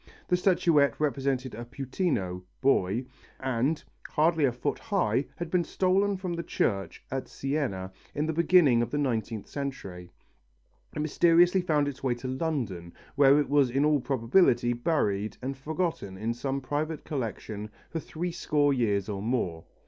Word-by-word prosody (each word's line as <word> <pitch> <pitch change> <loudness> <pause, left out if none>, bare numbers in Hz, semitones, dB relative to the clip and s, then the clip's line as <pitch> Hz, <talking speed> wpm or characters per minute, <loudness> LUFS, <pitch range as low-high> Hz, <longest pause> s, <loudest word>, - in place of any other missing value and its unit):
The 180 - +4
statuette 170 - +3
represented 135 -3 -1
a 115 - -6
puttino 120 - -2 0.2
(boy) 120 -3 +2 0.3
and, 130 +4 0 0.3
hardly 160 0 +3
a 130 - +2
foot 120 +1 -3
high, 145 - 0
had 170 -1 -5
been 180 -2 +3
stolen 195 +3 +1
from 185 -2 -4
the 170 - -2
church 100 -11 -2
at 135 0 -3
Siena 130 -10 -2 0.2
in 150 - 0
the 160 - -1
beginning 155 -7 +5
of 120 - -1
the 145 - -2
nineteenth 115 -6 -1
century. 95 -11 -6 0.9
It 150 - -1
mysteriously 175 +4 +4
found 150 -5 +1
its 140 -2 -5
way 130 -3 0
to 120 +2 -7
London, 130 - -3 0.2
where 140 0 +6
it 145 - 0
was 140 -2 +3
in 135 +4 +2
all 150 -1 +3
probability 120 -1 +3
buried 110 -7 0
and 135 +2 -4
forgotten 150 - -3
in 110 +4 -1
some 135 +3 -3
private 150 +4 -3
collection 110 -5 -4 0.2
for 165 - -2
three 170 +3 -4
score 150 -4 +1
years 105 -6 +1
or 100 -2 -4
more. 100 -8 -1
135 Hz, 155 wpm, -28 LUFS, 115-160 Hz, 0.9 s, where